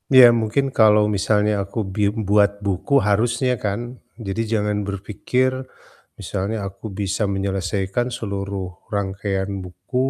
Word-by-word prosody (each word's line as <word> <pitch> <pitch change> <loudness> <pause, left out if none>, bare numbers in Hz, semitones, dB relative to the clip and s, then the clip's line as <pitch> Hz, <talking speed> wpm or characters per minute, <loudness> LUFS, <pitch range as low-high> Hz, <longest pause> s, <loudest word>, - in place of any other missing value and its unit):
Iya 125 -2 +11
mungkin 115 +6 +1
kalau 105 -1 +6
misalnya 105 +2 +2
aku 100 +4 -10 0.2
bim 105 0 +1
buat 100 0 +5
buku 100 +7 -1
harusnya 120 +5 +2
kan, 100 0 0 0.5
jadi 95 +4 -1
jangan 105 -1 +1
berfikir 105 +6 0 0.7
misalnya 100 +3 -2
aku 95 +3 -10
bisa 100 +1 -1
menyelesaikan 95 +3 -1
seluruh 100 -2 -4 0.2
rangkaian 95 -1 -2 0.2
buku, 90 +7 -9
100 Hz, 120 wpm, -22 LUFS, 95-110 Hz, 0.7 s, Iya